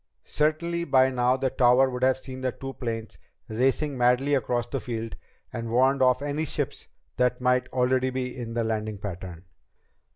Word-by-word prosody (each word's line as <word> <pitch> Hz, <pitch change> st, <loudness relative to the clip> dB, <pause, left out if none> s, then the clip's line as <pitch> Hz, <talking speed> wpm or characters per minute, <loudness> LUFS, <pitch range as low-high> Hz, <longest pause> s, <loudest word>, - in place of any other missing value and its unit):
Certainly 170 Hz, +3 st, 0 dB
by 130 Hz, -3 st, +4 dB
now 125 Hz, 0 st, +2 dB
the 130 Hz, -1 st, -1 dB
tower 125 Hz, +1 st, +5 dB
would 125 Hz, -1 st, -5 dB
have 130 Hz, 0 st, +3 dB
seen 130 Hz, 0 st, -9 dB
the 130 Hz, -1 st, 0 dB
two 135 Hz, +1 st, -7 dB
planes 115 Hz, -4 st, -5 dB, 0.3 s
racing 135 Hz, +4 st, 0 dB
madly 125 Hz, +4 st, +3 dB
across 120 Hz, -2 st, 0 dB
the 135 Hz, +3 st, -3 dB
field 115 Hz, -2 st, -5 dB, 0.4 s
and 115 Hz, -1 st, -4 dB
warned 130 Hz, +3 st, +3 dB
off 130 Hz, +1 st, +3 dB
any 145 Hz, +2 st, -1 dB
ships -, -, -4 dB, 0.3 s
that 125 Hz, 0 st, +2 dB
might 125 Hz, 0 st, +2 dB
already 130 Hz, +1 st, +2 dB
be 130 Hz, -1 st, -3 dB
in 115 Hz, -2 st, -6 dB
the 120 Hz, -, +1 dB
landing 110 Hz, -1 st, -2 dB
pattern. 90 Hz, -3 st, -7 dB
125 Hz, 170 wpm, -26 LUFS, 120-130 Hz, 0.4 s, tower